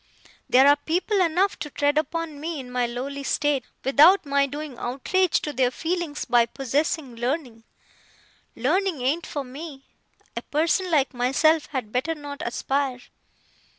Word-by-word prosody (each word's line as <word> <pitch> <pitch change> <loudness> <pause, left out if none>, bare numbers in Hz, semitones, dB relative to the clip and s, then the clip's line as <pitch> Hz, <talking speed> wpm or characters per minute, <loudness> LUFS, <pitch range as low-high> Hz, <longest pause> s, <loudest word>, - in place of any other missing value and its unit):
There 265 +2 +6
are 285 - +7
people 360 +7 0
enough 365 +3 +1
to 295 - -5
tread 290 +1 +1
upon 310 0 -2
me 320 0 -4
in 250 -2 -9
my 250 -1 0
lowly 265 +4 -5
state, 280 -1 0 0.2
without 305 +8 +6
my 280 0 +2
doing 290 -1 -6
outrage 315 +9 +1
to 300 - -3
their 255 -1 +2
feelings 325 +2 -3
by 240 -1 +3
possessing 275 +1 -2
learning. 240 -2 -3 0.9
Learning 315 +3 0
ain't 310 +6 0
for 285 - -4
me. 270 +2 -9 0.5
A - - -3
person 335 +5 0
like 285 -6 +2
myself 280 +6 +2
had 250 -7 -4
better 275 +7 -1
not 290 -1 -8
aspire. 265 +1 -2
285 Hz, 150 wpm, -24 LUFS, 255-320 Hz, 0.9 s, are